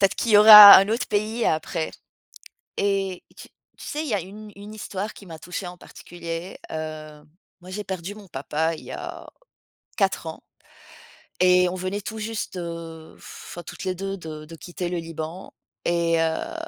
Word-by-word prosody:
peut-être 195 Hz, -1 st, +3 dB
qu'il 230 Hz, -, -1 dB
y -, -, +8 dB
aura 210 Hz, -1 st, +12 dB
un 195 Hz, +1 st, +4 dB
autre 225 Hz, +3 st, -1 dB
pays 215 Hz, +3 st, -1 dB
après 160 Hz, +1 st, -1 dB, 0.9 s
et 195 Hz, -2 st, -1 dB
et -, -, -25 dB
tu -, -, -12 dB, 0.3 s
tu -, -, -9 dB
sais, 300 Hz, -, -3 dB
il -, -, -5 dB
y 225 Hz, -, 0 dB
a 200 Hz, -, 0 dB
une 210 Hz, +4 st, -11 dB
une 205 Hz, +2 st, -11 dB
histoire 205 Hz, -1 st, -5 dB
qui 200 Hz, -, -15 dB
m'a 160 Hz, -2 st, -10 dB
touchée 180 Hz, +2 st, -6 dB
en 180 Hz, 0 st, -8 dB
particulier, 170 Hz, +1 st, -8 dB
heu, 155 Hz, -1 st, -7 dB, 0.4 s
moi, 180 Hz, +1 st, -13 dB
j'ai 205 Hz, +3 st, -5 dB
perdu 190 Hz, +1 st, -6 dB
mon 205 Hz, -3 st, -14 dB
papa 155 Hz, +3 st, -2 dB
il -, -, -13 dB
y -, -, -9 dB
a -, -, -8 dB, 0.7 s
4 195 Hz, -5 st, 0 dB
ans 160 Hz, -, -8 dB, 1.0 s
et 180 Hz, 0 st, +5 dB
on -, -, -5 dB
venait 185 Hz, +2 st, -4 dB
tout 220 Hz, +2 st, -7 dB
juste, 215 Hz, -3 st, -5 dB
heu, 165 Hz, -2 st, -8 dB
enfin, 175 Hz, -, -11 dB
toutes -, -, -9 dB
les 185 Hz, -1 st, -1 dB
2 195 Hz, +1 st, -4 dB
de 155 Hz, -4 st, -9 dB
de 165 Hz, +2 st, -12 dB
quitter 175 Hz, +1 st, -6 dB
le 180 Hz, -, -3 dB
Liban 165 Hz, +2 st, -7 dB, 0.3 s
et 170 Hz, -1 st, +1 dB
heu 165 Hz, -, -2 dB
180 Hz, 185 wpm, -24 LUFS, 165-205 Hz, 1.0 s, aura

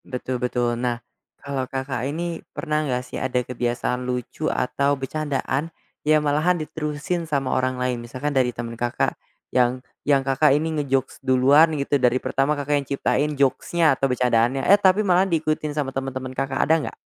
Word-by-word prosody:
Betul 125 Hz, -1 st, -4 dB
betul. 120 Hz, -1 st, 0 dB
Nah, 120 Hz, -1 st, 0 dB, 0.4 s
kalau 135 Hz, -2 st, -4 dB
Kakak 130 Hz, -1 st, -3 dB
ini 170 Hz, +2 st, -4 dB
pernah 155 Hz, -2 st, -1 dB
enggak 125 Hz, -2 st, -2 dB
sih, -, -, -6 dB
ada 125 Hz, -1 st, 0 dB
kebiasaan 125 Hz, 0 st, -2 dB
lucu 125 Hz, +4 st, -3 dB
atau 140 Hz, +2 st, 0 dB
bercandaan, 140 Hz, +1 st, -2 dB, 0.3 s
yang 155 Hz, 0 st, +3 dB
malahan 155 Hz, +5 st, +2 dB
diterusin 155 Hz, +2 st, -3 dB
sama 140 Hz, -3 st, 0 dB
orang 130 Hz, 0 st, 0 dB
lain, 125 Hz, -1 st, -1 dB
misalkan 130 Hz, +5 st, -4 dB
dari 130 Hz, -2 st, +3 dB
temen 120 Hz, -1 st, -5 dB
Kakak, 120 Hz, +1 st, -1 dB, 0.4 s
yang 125 Hz, +1 st, +2 dB, 0.2 s
yang 140 Hz, -2 st, +2 dB
Kakak 135 Hz, +1 st, +4 dB
ini 160 Hz, +1 st, -2 dB
nge-jokes 135 Hz, -2 st, -1 dB
duluan 135 Hz, +4 st, +5 dB
gitu, 140 Hz, 0 st, 0 dB
dari 125 Hz, 0 st, +4 dB
pertama 135 Hz, +3 st, 0 dB
Kakak 145 Hz, +1 st, -2 dB
yang 140 Hz, -, -12 dB
ciptain 145 Hz, +1 st, 0 dB
jokes-nya 145 Hz, +4 st, +2 dB
atau 135 Hz, +1 st, 0 dB
becandaannya, 125 Hz, +1 st, +2 dB
eh, 200 Hz, +1 st, +6 dB
tapi 195 Hz, +2 st, +4 dB
malah 185 Hz, +1 st, +3 dB
diikutin 155 Hz, -2 st, -1 dB
sama 135 Hz, -3 st, -1 dB
temen-temen 130 Hz, -1 st, -4 dB
Kakak, 135 Hz, 0 st, -2 dB
ada 160 Hz, -, +3 dB
enggak? -, -, -6 dB
135 Hz, 170 wpm, -23 LUFS, 125-150 Hz, 0.4 s, eh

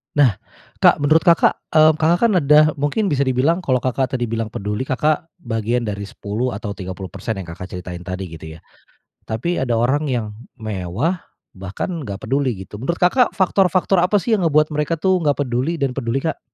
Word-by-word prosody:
Nah, 130 Hz, -9 st, +4 dB, 0.4 s
Kak, -, -, +5 dB
menurut 155 Hz, +4 st, +3 dB
Kakak, 170 Hz, -2 st, +4 dB, 0.2 s
eee, 155 Hz, 0 st, +7 dB
Kakak 165 Hz, +2 st, +2 dB
kan -, -, +1 dB
ada, 150 Hz, 0 st, +5 dB
mungkin 145 Hz, +9 st, 0 dB
bisa 140 Hz, -1 st, +1 dB
dibilang 130 Hz, +7 st, +2 dB
kalau 130 Hz, -9 st, 0 dB
Kakak 130 Hz, +1 st, -1 dB
tadi 120 Hz, -3 st, -2 dB
bilang 115 Hz, -1 st, -2 dB
peduli 105 Hz, +2 st, -4 dB
Kakak, 150 Hz, +4 st, 0 dB
bagian 115 Hz, -2 st, -1 dB
dari 100 Hz, -2 st, -4 dB
10 110 Hz, +6 st, -3 dB
atau 105 Hz, 0 st, -5 dB
30% 95 Hz, +2 st, -6 dB
yang, 95 Hz, -3 st, -7 dB
Kakak 90 Hz, +2 st, -7 dB
ceritain 90 Hz, -1 st, -7 dB
tadi 95 Hz, 0 st, -5 dB
gitu 80 Hz, -1 st, -9 dB
ya. -, -, -14 dB, 0.7 s
Tapi 145 Hz, +11 st, -2 dB
ada 120 Hz, -3 st, 0 dB
orang 140 Hz, +6 st, +1 dB
yang 120 Hz, -4 st, -1 dB, 0.3 s
mewah 110 Hz, -, -2 dB, 0.3 s
bahkan 100 Hz, -, -5 dB
enggak 100 Hz, -5 st, -6 dB
peduli 125 Hz, -7 st, -1 dB
gitu. 105 Hz, +3 st, -10 dB
Menurut 170 Hz, +6 st, -2 dB
Kakak, 235 Hz, +7 st, +3 dB
faktor-faktor 185 Hz, -1 st, +2 dB
apa 190 Hz, +3 st, +3 dB
sih 225 Hz, +4 st, +1 dB
yang 205 Hz, -, 0 dB
ngebuat 155 Hz, -1 st, +2 dB
mereka 150 Hz, +2 st, -1 dB
tuh 185 Hz, +1 st, +2 dB
enggak 145 Hz, -4 st, +1 dB
peduli 130 Hz, +7 st, -1 dB
dan 135 Hz, -3 st, -1 dB
peduli, 125 Hz, -1 st, -1 dB
Kak? 160 Hz, -2 st, -2 dB
130 Hz, 185 wpm, -20 LUFS, 110-160 Hz, 0.7 s, eee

